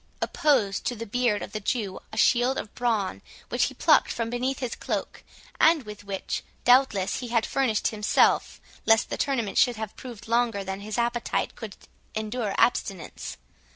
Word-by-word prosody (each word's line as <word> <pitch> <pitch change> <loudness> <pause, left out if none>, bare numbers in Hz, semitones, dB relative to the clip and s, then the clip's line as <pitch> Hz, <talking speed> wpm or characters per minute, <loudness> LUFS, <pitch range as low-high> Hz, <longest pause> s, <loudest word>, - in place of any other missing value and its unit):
opposed 230 -10 +1
to 245 - -1
the 230 +1 -6
beard 230 -1 0
of - - -8
the 215 - -3
Jew 205 -2 -2
a - - -8
shield 245 +2 +3
of 210 - -5
brawn, 225 -6 -1 0.3
which - - +2
he - - -5
plucked - - +4
from 230 -1 -3
beneath 255 +2 -1
his 250 -3 -3
cloak, - - -4 0.4
and 320 -3 +5
with 210 -1 -10
which, 195 -1 -4 0.2
doubtless, 245 -7 +3
he 250 - -5
had 230 -1 +1
furnished 255 -6 +1
himself, 210 -1 +2 0.3
lest 225 0 +4
the - - 0
tournament 240 -8 0
should 245 -2 +4
have 220 -1 -6
proved 235 -3 -10
longer 230 -3 +1
than 190 0 -4
his 210 +2 -5
appetite 235 0 -1
could 215 -3 -8 0.4
endure 215 -1 -2
abstinence. 195 -7 0
230 Hz, 170 wpm, -26 LUFS, 210-245 Hz, 0.4 s, and